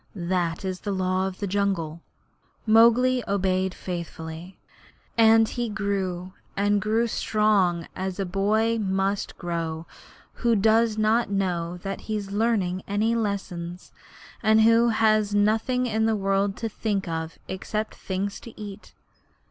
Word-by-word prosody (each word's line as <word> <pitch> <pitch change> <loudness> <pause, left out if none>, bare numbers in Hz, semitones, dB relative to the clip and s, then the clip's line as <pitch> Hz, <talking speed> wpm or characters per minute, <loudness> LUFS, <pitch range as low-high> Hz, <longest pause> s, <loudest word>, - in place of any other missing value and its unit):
That 175 -1 -1
is 185 -1 -3
the 205 - -4
Law 185 0 0
of 190 -1 -6
the 205 - -3
Jungle.' 185 -5 -1 0.6
Mowgli 235 +3 +5
obeyed 190 -1 0
faithfully. 170 0 -7 0.6
And 225 -1 +6
he 240 0 -3
grew 190 -3 -2 0.2
and 205 0 +2
grew 220 +3 +1
strong 205 -7 +1
as 190 0 -4
a 195 - 0
boy 215 +5 +1
must 195 0 -1
grow 165 -2 -3 0.6
who 235 -2 +3
does 220 +1 +3
not 220 +2 +2
know 180 -3 -1
that 195 0 -4
he 215 - -4
is 200 -1 -6
learning 200 -4 0
any 210 +3 +1
lessons, 185 -5 -3 0.5
and 220 0 +4
who 230 +1 +5
has 215 -2 +2
nothing 225 +5 +2
in 220 -2 +1
the 220 - +2
world 195 0 0
to 230 - -2
think 205 -3 -2
of 160 0 -4
except 210 +3 -3
things 195 +1 -4
to 230 - -13
eat. 205 -2 -9
200 Hz, 140 wpm, -25 LUFS, 185-220 Hz, 0.6 s, And